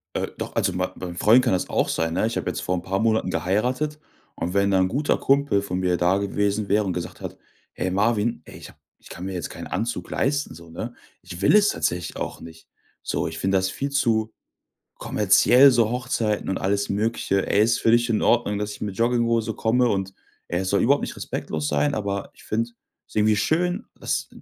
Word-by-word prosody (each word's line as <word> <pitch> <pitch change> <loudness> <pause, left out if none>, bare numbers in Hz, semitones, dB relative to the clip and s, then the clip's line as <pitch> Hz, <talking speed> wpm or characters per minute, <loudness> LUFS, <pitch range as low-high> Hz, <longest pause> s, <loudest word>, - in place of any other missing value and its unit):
Äh, - - -1
doch, - - -6
also 95 - +1
mein 90 +1 -1
beim 90 -2 -7
Freund 115 +8 +5
kann 120 -6 +2
das 90 - -1
auch - - +1
sein, 80 0 -1
ne? 110 - +1
Ich 115 - -3
hab - - -3
jetzt - - -2
vor 90 - -1
'n 85 - -4
paar 95 +1 -1
Monaten 110 -3 +1
geheiratet 125 +11 -1 0.4
und 85 +3 -3
wenn 100 0 +2
da 95 - +3
'n 95 - +3
guter 140 +8 0
Kumpel 140 -7 +2
von 90 -2 -3
mir 90 -1 +1
da 90 +3 +2
gewesen 100 +1 -1
wäre 105 +2 +3
und 95 -3 -2
gesagt 85 0 -6
hat: - - -7 0.4
„Ey, 95 - -2
Marvin, 105 +4 +1
ey, - - -12
ich - - -11
hab - - -19 0.2
ich - - -17
kann 90 - -7
mir 95 - -4
jetzt 90 -4 -4
keinen - - -8
Anzug 120 +2 -3
leisten 145 - 0
so, 85 +1 -13
ne? 110 +9 -6 0.3
Ich 90 0 -8
will 100 - +4
es 205 -1 +4
tatsächlich 85 -2 -2
auch - - -5
nicht. 80 0 -12 0.3
So, - - -2
ich 80 0 -6
find 95 +1 0
das 95 -1 +2
viel 140 +8 -3
zu 115 -6 +1 0.7
kommerziell 135 +3 +5
so 115 -2 +2
Hochzeiten 120 -4 -1
und 95 - -1
alles 100 +1 0
Mögliche, 100 -2 0
ey, 105 - +4
ist 115 +1 +2
für 115 - +3
dich 120 +1 +3
in 110 -2 +1
Ordnung, 115 -4 +2
dass 105 0 -3
ich 100 - -11
mit 100 -3 -4
Jogginghose 115 -1 +1
komme 120 +2 +2
und, 95 -2 -2 0.3
ey, 85 - -1
es 95 0 -2
soll 100 - +2
überhaupt 140 +4 +4
nicht - - -5
respektlos 75 -1 -4
sein, 75 0 +1
aber 100 -2 -3
ich - - -18
find's 115 +2 -2 0.4
irgendwie 105 0 +3
schön, 175 - 0
dass - - -2
105 Hz, 220 wpm, -24 LUFS, 95-120 Hz, 0.7 s, Freund